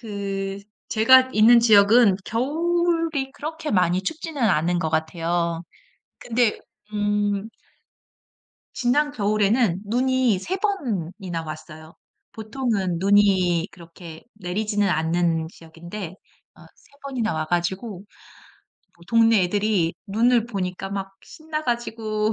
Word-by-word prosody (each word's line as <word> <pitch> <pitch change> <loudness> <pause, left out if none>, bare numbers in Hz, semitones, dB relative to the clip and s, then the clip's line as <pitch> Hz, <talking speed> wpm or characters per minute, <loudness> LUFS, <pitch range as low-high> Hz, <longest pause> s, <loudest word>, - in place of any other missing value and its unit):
그 195 -3 -4 0.3
제가 260 +4 +5
있는 225 +3 +6
지역은 215 -1 +5
겨울이 330 +2 0
그렇게 315 +2 -6
많이 180 -1 +2
춥지는 310 - -5
않은 175 -4 +2
것 160 -2 -2
같아요 165 +1 -1 0.6
근데 235 -2 0 0.3
음 205 0 -1 1.3
지난 290 +4 +1
겨울에는 210 -3 +1
눈이 250 -2 +1
3 370 - -3
번이나 195 - -3
왔어요. 155 +1 -10 0.4
보통은 215 -6 -2
눈이 190 -3 +3
그렇게 170 -1 -13
내리지는 205 +2 -1
않는 165 -1 0
지역인데 170 +3 -9 0.4
어 - - -16
3 - - -26
번이나 245 -9 -2
와 155 - -2
가지고 180 +5 -2 1.0
뭐 170 - -20
동네 225 -3 +4
애들이 200 -3 0
눈을 230 +3 +2
보니까 195 -3 -4
막 195 -1 -5
신나 310 -1 -6
가지고 225 -3 -2
205 Hz, 230 characters per minute, -23 LUFS, 175-240 Hz, 1.3 s, 있는